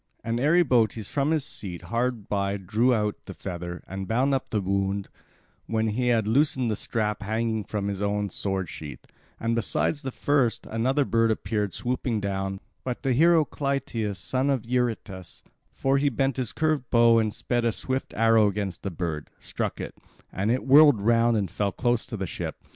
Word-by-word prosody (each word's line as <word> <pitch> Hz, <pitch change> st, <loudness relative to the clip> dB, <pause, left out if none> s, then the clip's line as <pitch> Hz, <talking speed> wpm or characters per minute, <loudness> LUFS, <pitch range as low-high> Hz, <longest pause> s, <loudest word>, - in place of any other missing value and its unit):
And 115 Hz, +1 st, -1 dB
Eribotes 125 Hz, -, +3 dB
from 140 Hz, 0 st, 0 dB
his 155 Hz, -3 st, +1 dB
seat 90 Hz, -4 st, -6 dB
hard 120 Hz, -2 st, -2 dB
by 100 Hz, 0 st, 0 dB
drew 110 Hz, +6 st, +1 dB
out 105 Hz, -3 st, 0 dB
the -, -, -8 dB
feather, 85 Hz, -1 st, -6 dB
and 95 Hz, 0 st, -5 dB
bound 130 Hz, +5 st, +2 dB
up 135 Hz, -, -1 dB
the 110 Hz, -, 0 dB
wound 100 Hz, 0 st, -1 dB, 0.6 s
when 110 Hz, 0 st, 0 dB
he 125 Hz, +4 st, -1 dB
had 115 Hz, -3 st, +2 dB
loosed 140 Hz, +6 st, +3 dB
the 110 Hz, -, 0 dB
strap 105 Hz, 0 st, -2 dB
hanging 110 Hz, +1 st, -1 dB
from 100 Hz, +1 st, -3 dB
his 100 Hz, -1 st, -3 dB
own 100 Hz, -1 st, -1 dB
sword 95 Hz, -2 st, -2 dB
sheath; 75 Hz, -1 st, -9 dB, 0.3 s
and 115 Hz, 0 st, 0 dB
besides 115 Hz, +6 st, 0 dB
the 135 Hz, -, -4 dB
first, 135 Hz, -2 st, +1 dB
another 130 Hz, +6 st, +1 dB
bird 115 Hz, -2 st, +2 dB
appeared 105 Hz, -2 st, -1 dB
swooping 125 Hz, -2 st, -1 dB
down; 95 Hz, -1 st, -2 dB, 0.2 s
but 125 Hz, -2 st, -4 dB
the 135 Hz, -, +2 dB
hero 165 Hz, +3 st, +5 dB
Clytius, 130 Hz, -8 st, -2 dB
son 130 Hz, +9 st, -1 dB
of 130 Hz, -4 st, 0 dB
Eurytus—for 120 Hz, +2 st, -2 dB
he 145 Hz, +1 st, +3 dB
bent 135 Hz, +1 st, 0 dB
his 125 Hz, -4 st, -1 dB
curved 155 Hz, -5 st, 0 dB
bow, 115 Hz, -1 st, +5 dB
and 110 Hz, -1 st, +1 dB
sped 120 Hz, +2 st, -1 dB
a 115 Hz, -, +2 dB
swift 130 Hz, +4 st, -3 dB
arrow 115 Hz, -1 st, +5 dB
against 100 Hz, -2 st, -3 dB
the 100 Hz, -, -3 dB
bird—struck 80 Hz, -4 st, -4 dB
it, -, -, -6 dB, 0.4 s
and 100 Hz, +3 st, -1 dB
it 125 Hz, +3 st, 0 dB
whirled 145 Hz, -2 st, +7 dB
round 115 Hz, +2 st, +3 dB
and 100 Hz, -5 st, -1 dB
fell 100 Hz, -1 st, -1 dB
close 120 Hz, +2 st, 0 dB
to 115 Hz, -, -5 dB
the 95 Hz, -, -2 dB
ship. 80 Hz, -, -5 dB
115 Hz, 180 wpm, -26 LUFS, 100-130 Hz, 0.6 s, whirled